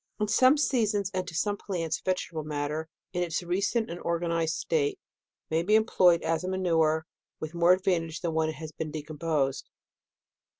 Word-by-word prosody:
In 210 - +1
some 255 +7 +5
seasons, 215 -8 +1
and 185 -1 -2
to 170 - -7
some 205 +5 0
plants, 165 -6 -3
vege 185 -1 -1
table 160 -2 -4
matter, 150 +1 -3 0.2
in 180 - -1
its 175 0 -1
recent 200 +6 0
and 170 +1 -6
organized 170 -1 0
state, 150 -3 0 0.5
may 160 +1 +2
be 210 +5 +3
employed 185 -6 +4
as 165 +1 0
a 185 - -2
manure 160 -4 +1 0.3
with 155 +1 -5
more 170 +1 +5
advantage 175 -4 0
than 170 -3 -1
when 160 0 +1
it 160 - -5
has 155 +1 -7
been 155 0 -5
de 150 -1 -5
composed. 150 -3 -1
170 Hz, 180 wpm, -28 LUFS, 160-185 Hz, 0.5 s, some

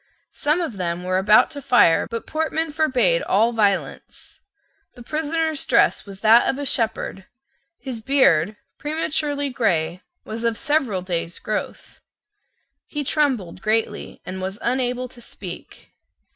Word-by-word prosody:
Some 305 +4 +1
of 300 - -4
them 175 -1 -2
were 185 +1 +1
about 210 +3 +5
to 285 -2 -7
fire: 240 -11 +4
but 230 -1 -5
Portman 320 0 -1
forbade 315 - +2
all 225 - +2
violence. 205 -3 -2 0.5
The 245 - -11
prisoner's 315 +2 -1
dress 235 -3 +2
was 195 -1 -10
that 225 +2 +6
of 265 - -1
a 285 - -4
shepherd; 225 -6 -2 0.5
his 250 -5 -7
beard, 215 - +3 0.2
prematurely 295 -2 -1
grey, 175 -7 0 0.2
was 225 +2 -6
of 230 -1 0
several 275 - 0
days' 170 -2 -3
growth. 215 - -5 0.9
He 295 -1 -3
trembled 260 - 0
greatly, 220 +2 -1
and 185 +1 -6
was 190 +2 -4
unable 250 0 0
to 245 -1 -15
speak. - - -10
235 Hz, 135 wpm, -22 LUFS, 195-290 Hz, 0.9 s, that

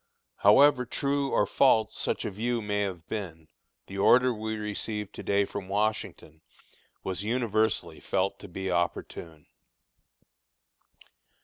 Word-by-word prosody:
However 125 +5 +6
true 140 +3 -1
or 105 - +2
false 110 -1 +3
such - - -2
a 110 - -2
view 120 +4 -1
may 105 -1 -1
have 90 -5 -4
been, 80 -7 -6 0.4
the 100 0 -7
order 125 +5 +5
we 110 0 -4
received 105 -1 -4
to - - -8
day 100 0 +1
from 100 -1 -7
Washington 105 -6 -2 0.6
was 95 +1 -3
universally 110 -7 0
felt 95 0 -1
to 100 - -10
be 95 +1 -4
opportune. 85 -2 -3
105 Hz, 125 wpm, -28 LUFS, 95-110 Hz, 0.6 s, However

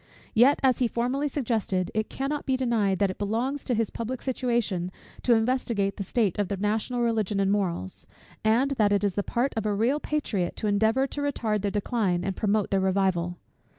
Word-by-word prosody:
Yet, 250 +5 +5
as 260 -2 +3
he 250 - +3
formerly 250 +5 -1
suggested, 220 - -1
it 215 0 -1
cannot 285 +2 -3
be 260 -1 +2
denied, 225 -7 +1
that 200 -1 +2
it - - -11
belongs 235 +7 -1
to 250 - 0
his 225 -1 0
public 240 +2 -4
situation 235 -9 -1 0.3
to 240 - +4
investigate 225 -4 0
the 200 - -2
state 210 -1 0
of 205 - +1
the 200 - -3
national 220 +5 -1
Religion 220 -4 0
and 195 0 +2
morals; 175 - -2 0.4
and 235 +6 +3
that 210 -2 +3
it 205 0 +2
is 200 -2 +1
the 205 - 0
part 240 +6 -1
of 220 -1 -1
a 205 - +1
real 240 +8 +2
patriot 230 -14 -2
to - - -4
endeavour 220 +5 +2
to 285 +2 -5
retard 225 -7 -1
their 205 - 0
decline, 200 -3 0
and 195 0 -2
promote 210 -1 0
their 195 - +3
revival. 190 -2 +1
220 Hz, 200 wpm, -27 LUFS, 200-250 Hz, 0.4 s, Yet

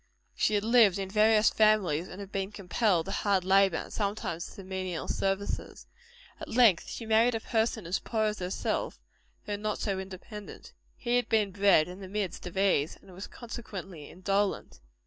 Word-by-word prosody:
She 215 - +1
had 205 - +1
lived 225 -4 +5
in 190 -1 -4
various 215 +1 +4
families, 195 -7 +3
and 190 - -10
had 200 -1 -8
been 195 0 -3
compelled 195 -2 0
to 195 - -5
hard 195 -2 +1
labor, 195 -2 +4
and - - -7
sometimes 200 -5 -3
to 195 - -9
menial 185 -2 -4
services. 195 +1 -2 0.5
At - - -7
length 225 -7 +4
she 230 - -6
married 225 +2 +3
a - - -1
person 220 -2 -1
as 175 +3 -1
poor 220 -2 -1
as 210 0 -1
herself, 180 +1 -2 0.5
though 205 -1 -3
not 210 +1 -2
so 195 -3 -2
independent. 195 +2 -9 0.2
He 240 0 +1
had 245 -2 -1
been 215 -3 +2
bred 195 -5 +4
in 180 +2 -9
the 190 - -8
midst 195 -3 -4
of 180 - -8
ease; 190 -6 +2
and 190 - -16
was, 190 +3 -8
consequently, 195 -9 -8
indolent. 195 +2 -1
200 Hz, 180 wpm, -29 LUFS, 185-215 Hz, 0.5 s, lived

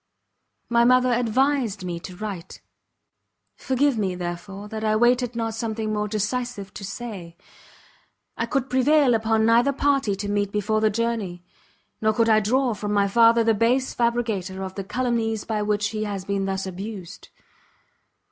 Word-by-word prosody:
My 235 0 +3
mother 255 0 +4
advised 245 -3 +1
me 175 -1 -4
to 180 +1 -9
write; 190 -3 -7 1.0
forgive 265 -2 +1
me, 190 -3 -1
therefore, 180 +3 -6
that 220 +1 -6
I 215 0 +2
waited 240 +1 +2
not 225 -1 -2
something 220 -1 -3
more 210 0 -1
decisive 215 -1 -3
to - - -8
say. 195 -6 -7 1.0
I - - -2
could 275 -3 -1
prevail 260 +1 +4
upon 220 0 +2
neither 235 +4 +4
party 275 -6 +1
to 205 +1 -5
meet 205 -1 0
before 210 +1 0
the 215 - +4
journey; 215 -5 -2 0.6
nor 215 0 +2
could 230 +1 +2
I 215 -1 +6
draw 245 +4 +1
from 210 0 -3
my 200 -1 +3
father 230 +2 +5
the 225 0 +3
base 240 +5 +1
fabricator 220 -6 -1
of 190 -1 -6
the 195 - -5
calumnies 225 -1 -1
by 215 -2 -1
which 210 0 0
he 215 -1 -3
has 200 -3 -4
been 200 -1 -1
thus 195 0 -2
abused. 190 0 -8
220 Hz, 160 wpm, -24 LUFS, 200-240 Hz, 1.0 s, I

